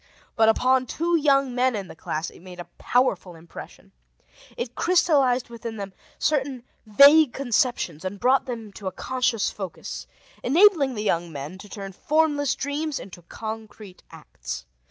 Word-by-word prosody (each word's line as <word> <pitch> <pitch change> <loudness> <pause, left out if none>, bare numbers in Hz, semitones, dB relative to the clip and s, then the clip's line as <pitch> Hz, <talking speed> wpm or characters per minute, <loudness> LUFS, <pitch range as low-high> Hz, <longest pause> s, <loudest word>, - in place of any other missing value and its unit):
But 220 0 +5
upon 255 +3 +2
two 340 +7 0
young 275 -4 +3
men 250 0 +1
in 200 -3 -4
the - - -11
class, 160 0 -4
it - - -16
made 180 0 -12
a 175 - -6
powerful 200 -8 0
impression. 165 +1 -12 0.7
It 240 0 -4
crystallized 275 -9 +2
within 230 -1 -7
them 200 -2 -6 0.2
certain 270 -4 -1 0.2
vague 280 +5 +7
conceptions 240 - -1
and 190 +2 -5
brought 260 +4 +3
them 225 -4 -6
to 195 - -8
a - - -1
conscious 250 +1 -1
focus, 190 -5 -7 0.3
enabling 305 -3 +4
the 210 - -3
young 170 -4 0
men 150 +5 -7
to 205 - -12
turn 195 -1 -7
formless 290 - +1
dreams 290 +1 -3
into 180 -2 -11
concrete 215 0 -9
acts. - - -8
240 Hz, 155 wpm, -24 LUFS, 195-275 Hz, 0.7 s, vague